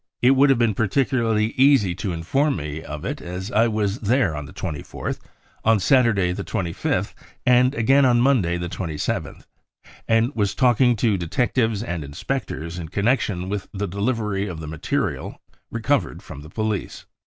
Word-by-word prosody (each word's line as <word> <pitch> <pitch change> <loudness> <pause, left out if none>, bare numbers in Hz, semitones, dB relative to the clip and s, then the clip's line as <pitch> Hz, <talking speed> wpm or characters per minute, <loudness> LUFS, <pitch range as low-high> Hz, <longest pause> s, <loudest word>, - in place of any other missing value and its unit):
It 125 - +7
would 135 +1 +5
have 135 - +4
been 115 -2 +2
particularly 115 0 +1
easy 130 -9 +4
to 95 +1 -4
inform 135 - 0
me 75 -1 -5
of 75 -1 -7
it - - -4
as 90 +5 -6
I 115 0 +4
was 105 -1 -1
there 110 - +1
on 75 -1 -5
the - - -12
24th, 75 -3 -5 0.4
on 110 -1 +4
Saturday 115 -7 +3
the 90 - -4
25th, 85 -3 -2 0.3
and 125 +2 +4
again 135 +4 +4
on 125 -2 +4
Monday 120 -10 +2
the 85 0 -3
27th, 85 -3 -4 0.6
and 115 +4 +2
was 100 -2 0
talking 125 -1 +4
to 105 -2 +1
detectives 110 +4 0
and 85 -9 -4
inspectors 85 - -4
in 80 -2 -6
connection 100 -2 0
with 100 0 -4
the 100 +1 -2
delivery 105 0 -1
of 85 -4 -6
the 80 - -6
material 75 0 -3 0.3
recovered 125 +5 -1
from 70 - -9
the 75 - -11
police. 110 +1 -3
105 Hz, 165 wpm, -23 LUFS, 90-125 Hz, 0.6 s, It